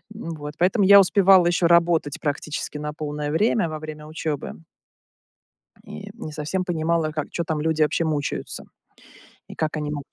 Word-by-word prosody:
Вот. 155 Hz, -7 st, -7 dB
Поэтому 190 Hz, +4 st, +3 dB
я 200 Hz, +1 st, +9 dB
успевала 190 Hz, -2 st, +5 dB
еще 175 Hz, 0 st, +1 dB
работать 170 Hz, -3 st, +2 dB
практически 150 Hz, 0 st, -3 dB
на 150 Hz, 0 st, -5 dB
полное 150 Hz, -1 st, -4 dB
время 210 Hz, +3 st, +2 dB
во 155 Hz, 0 st, -5 dB
время 155 Hz, -1 st, -8 dB
учебы. 155 Hz, 0 st, -5 dB, 1.2 s
И -, -, -9 dB
не 155 Hz, -, -8 dB
совсем 155 Hz, +5 st, -3 dB
понимала, 165 Hz, -2 st, 0 dB
как 155 Hz, -1 st, -4 dB
чё 170 Hz, -, -3 dB
там 160 Hz, -2 st, -2 dB
люди 160 Hz, 0 st, +1 dB
вообще 155 Hz, +2 st, +1 dB
мучаются. 150 Hz, -3 st, -3 dB, 0.8 s
И -, -, -11 dB
как 155 Hz, 0 st, -2 dB
они 150 Hz, -1 st, -3 dB
могут 145 Hz, -2 st, -5 dB
155 Hz, 160 wpm, -23 LUFS, 150-170 Hz, 1.2 s, я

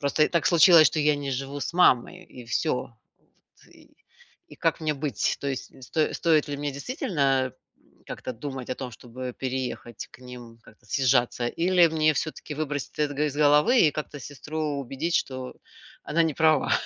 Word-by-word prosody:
просто 145 Hz, +2 st, +2 dB
так 170 Hz, -2 st, 0 dB
случилось, 170 Hz, -2 st, +7 dB
что 155 Hz, -, -4 dB
я 150 Hz, 0 st, +3 dB
не 140 Hz, -1 st, -4 dB
живу 135 Hz, +2 st, -4 dB
с -, -, -3 dB
мамой 180 Hz, +1 st, +3 dB, 0.2 s
и -, -, -10 dB
всё. 125 Hz, +6 st, 0 dB, 0.6 s
Вот, -, -, -27 dB
и -, -, -19 dB, 0.6 s
и -, -, -11 dB
как -, -, 0 dB
мне 155 Hz, -1 st, 0 dB
быть? 140 Hz, -7 st, -1 dB
То 140 Hz, -, -4 dB
есть, 135 Hz, -2 st, -4 dB
сто 155 Hz, +4 st, -1 dB
стоит 155 Hz, -3 st, +2 dB
ли 145 Hz, -, -3 dB
мне 145 Hz, 0 st, -3 dB
действительно, 150 Hz, -, -3 dB, 0.5 s
м, -, -, -31 dB
как-то -, -, -6 dB
думать 130 Hz, +1 st, -7 dB
о -, -, 0 dB
том, 130 Hz, -2 st, -6 dB
чтобы 125 Hz, +2 st, -8 dB
переехать 125 Hz, -3 st, -5 dB
к -, -, -16 dB
ним, 120 Hz, -2 st, -11 dB
как-то 110 Hz, -, -20 dB
съезжаться 125 Hz, -1 st, +1 dB, 0.2 s
или 180 Hz, -2 st, +6 dB
мне 155 Hz, -1 st, +2 dB
всё-таки 150 Hz, 0 st, -4 dB
выбросить 145 Hz, -1 st, -4 dB
эт 150 Hz, -1 st, +1 dB
го 150 Hz, -, +1 dB
из 145 Hz, -2 st, -2 dB
головы 150 Hz, -, +5 dB
и -, -, +1 dB
как-то 150 Hz, -1 st, -6 dB
сестру 150 Hz, +4 st, -7 dB, 0.2 s
убедить, 135 Hz, +6 st, -4 dB
что 130 Hz, -1 st, -3 dB, 0.5 s
она 165 Hz, +2 st, +3 dB
не 160 Hz, -2 st, 0 dB
права? 155 Hz, -2 st, +3 dB
145 Hz, 180 wpm, -26 LUFS, 130-155 Hz, 0.6 s, случилось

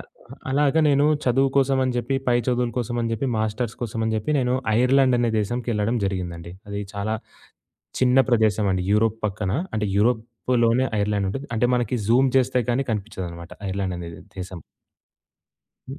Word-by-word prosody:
అ -, -, -7 dB
ఆహ్, -, -, -17 dB
అలాగా 145 Hz, +3 st, +3 dB
నేను 145 Hz, +1 st, +4 dB, 0.2 s
చదువు 135 Hz, +2 st, +3 dB
కోసమని 130 Hz, -1 st, +2 dB
జెప్పి, 120 Hz, +3 st, -1 dB
పై 120 Hz, -1 st, +4 dB
చదువుల 125 Hz, -1 st, +1 dB
కోసం 120 Hz, 0 st, -2 dB
అని 115 Hz, -1 st, -1 dB
జెప్పి, 115 Hz, +5 st, -1 dB
మాస్టర్స్ 110 Hz, +2 st, -2 dB
కోసమని 110 Hz, -1 st, -2 dB
జెప్పి, 110 Hz, +8 st, -3 dB
నేను 125 Hz, -1 st, +1 dB, 0.2 s
ఐర్లాండ్ 130 Hz, 0 st, +4 dB
అనే 120 Hz, -1 st, +1 dB
దేశంకి 120 Hz, +4 st, -2 dB
ఎళ్ళడం 105 Hz, +3 st, 0 dB
జరిగిందండి. 90 Hz, -3 st, -4 dB, 0.2 s
అది 100 Hz, 0 st, -4 dB
చాలా 100 Hz, +2 st, -2 dB, 0.9 s
చిన్న 130 Hz, 0 st, +4 dB
ప్రదేశం 110 Hz, -3 st, +2 dB
అండి. 90 Hz, -1 st, -1 dB
యూరోప్ 110 Hz, +1 st, +2 dB
పక్కన 100 Hz, -1 st, -3 dB, 0.2 s
అంటే 105 Hz, -2 st, 0 dB
యూరోప్‌లోనే 120 Hz, +2 st, +1 dB
ఐర్లాండుంటది. 100 Hz, +5 st, -1 dB
అంటే 120 Hz, +2 st, +2 dB
మనకి 120 Hz, 0 st, -1 dB
జూమ్ 130 Hz, +3 st, +4 dB
చేస్తే 125 Hz, 0 st, +1 dB
కానీ 135 Hz, +3 st, +1 dB
కనిపిచ్చదనమాట 95 Hz, -5 st, -6 dB, 0.2 s
ఐర్లాండ్ 95 Hz, -2 st, -2 dB
అనేది 85 Hz, -1 st, -8 dB, 0.2 s
దేశం. 90 Hz, -3 st, -7 dB, 1.2 s
హ్మ్. 135 Hz, +3 st, -8 dB
115 Hz, 155 wpm, -23 LUFS, 100-125 Hz, 1.2 s, నేను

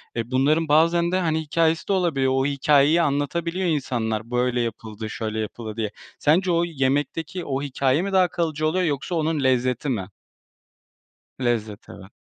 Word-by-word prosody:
E, 115 Hz, +1 st, -3 dB
bunların 150 Hz, +5 st, +2 dB
bazen 170 Hz, +3 st, +3 dB
de, 185 Hz, -, +1 dB
hani, 160 Hz, -3 st, 0 dB
hikâyesi 160 Hz, +1 st, 0 dB
de 200 Hz, -, +1 dB
olabiliyor, 150 Hz, -8 st, +1 dB
o 135 Hz, 0 st, +1 dB
hikâyeyi 145 Hz, +3 st, +3 dB
anlatabiliyor 170 Hz, +5 st, -1 dB
insanlar, 115 Hz, -6 st, -2 dB
böyle 125 Hz, 0 st, +1 dB
yapıldı, 110 Hz, -1 st, -5 dB
şöyle 110 Hz, 0 st, -4 dB
yapıldı 110 Hz, 0 st, -6 dB
diye. 110 Hz, -2 st, -2 dB, 0.3 s
Sence 175 Hz, +5 st, +3 dB
o 170 Hz, 0 st, +2 dB
yemekteki 150 Hz, +3 st, -2 dB
o 135 Hz, -1 st, -2 dB
hikâye 140 Hz, +1 st, +1 dB
mi 200 Hz, +2 st, -3 dB
daha 185 Hz, -1 st, +5 dB
kalıcı 160 Hz, -3 st, -1 dB
oluyor 180 Hz, +4 st, +1 dB
yoksa 150 Hz, +3 st, -2 dB
onun 155 Hz, -2 st, 0 dB
lezzeti 130 Hz, +1 st, +1 dB
mi? 105 Hz, -8 st, -2 dB, 1.3 s
Lezzet, 110 Hz, -5 st, -2 dB
evet. 95 Hz, +2 st, -12 dB
145 Hz, 155 wpm, -23 LUFS, 120-165 Hz, 1.3 s, daha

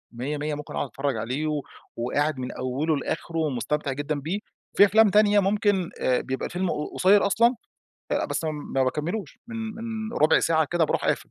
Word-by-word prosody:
ميَّة 140 Hz, +5 st, -3 dB
ميَّة 150 Hz, +1 st, -2 dB
ممكن 150 Hz, 0 st, -8 dB
أقعد 145 Hz, -, -1 dB
أتفرّج 135 Hz, -2 st, -2 dB
عليه 130 Hz, +8 st, -2 dB
و 150 Hz, -1 st, -1 dB, 0.4 s
وقاعد 140 Hz, +4 st, 0 dB
من 125 Hz, -, -4 dB
أوله 140 Hz, +5 st, -1 dB
لآخره 165 Hz, +3 st, -4 dB
ومستمتع 150 Hz, 0 st, -1 dB
جدًا 145 Hz, +2 st, -2 dB
بيه، 165 Hz, +9 st, -3 dB, 0.4 s
في 205 Hz, -, +9 dB
أفلام 215 Hz, +1 st, +5 dB
تانية 210 Hz, 0 st, +5 dB
ممكن 195 Hz, -2 st, +1 dB
آآ 125 Hz, -1 st, +2 dB
بيبقى 130 Hz, 0 st, -3 dB
الفيلم 180 Hz, 0 st, -2 dB
ق 150 Hz, -, -4 dB
قصيّر 200 Hz, +2 st, +5 dB
أصلًا، 235 Hz, +5 st, +3 dB, 0.6 s
آآ -, -, +1 dB
بس -, -, -3 dB
ما 145 Hz, -4 st, -1 dB
باكملوش 155 Hz, +7 st, -3 dB
من 230 Hz, -, -6 dB, 0.2 s
من 225 Hz, 0 st, -5 dB
ربع 155 Hz, -5 st, +4 dB
ساعة 160 Hz, -1 st, +3 dB
كده 175 Hz, -2 st, +3 dB
باروح -, -, -1 dB
قافل. -, -, -1 dB
155 Hz, 185 wpm, -25 LUFS, 145-200 Hz, 0.6 s, في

